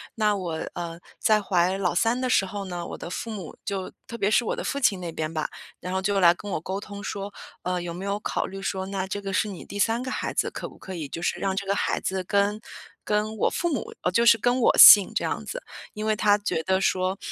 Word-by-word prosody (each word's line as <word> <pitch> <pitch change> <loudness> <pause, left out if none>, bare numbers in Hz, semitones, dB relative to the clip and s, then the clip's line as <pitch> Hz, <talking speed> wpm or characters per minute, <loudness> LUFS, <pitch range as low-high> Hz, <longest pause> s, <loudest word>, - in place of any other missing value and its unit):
那 215 -2 +2
我， 180 -4 -4 0.2
呃， 170 -1 -5 0.2
在 215 -1 +3
怀 185 -1 +1
老 185 -3 0
三 230 +6 +2
的 255 0 -1
时 195 - +3
候 200 +1 -5
呢， 175 -2 -5
我 - - -7
的 - - -7
父 230 - -5
母 195 -7 -7
就 195 -2 -3 0.2
特 235 - -7
别 200 -2 +1
是 240 - +4
我 - - -1
的 - - -5
父 280 - -2
亲 210 -8 +2
那 170 -2 -4
边 155 -1 -3
吧， 155 -1 -2 0.3
然 180 +1 -4
后 190 - 0
就 200 +1 +1
来 170 -1 +7
跟 205 +4 -9
我 - - -1
沟 190 +4 -4
通 200 0 -9
说， 200 -1 -5 0.3
呃， 180 0 -1
有 175 -1 -5
没 180 +3 -7
有 200 0 -1
考 - - -1
虑 195 0 -7
说， 190 -1 -2
那 195 -1 -2
这 205 +1 -4
个 195 -1 -4
是 205 - +1
你 190 - -8
第 200 - -7
三 225 +3 +2
个 260 - -4
孩 - - -3
子， - - 0
可 - - -6
不 - - -15
可 190 - -9
以 160 -4 -5
就 165 - -6
是 - - -1
让 195 -1 -1
这 200 - -3
个 195 - +1
孩 - - 0
子 190 0 -2
跟 200 +3 +1 0.4
跟 215 +1 -1
我 - - +2
父 345 - -1
母 - - -4 0.2
就 235 +5 +3
是 235 -1 +7
跟 245 +3 +1
我 - - +4
姓 200 -3 +10
这 - - +1
样 - - -2
子。 - - -5 0.3
因 215 0 -5
为 215 0 +2
他 205 -1 +4
觉 205 -5 -2
得 190 +2 +1
说 185 +1 0
195 Hz, 285 characters per minute, -25 LUFS, 185-210 Hz, 0.4 s, 姓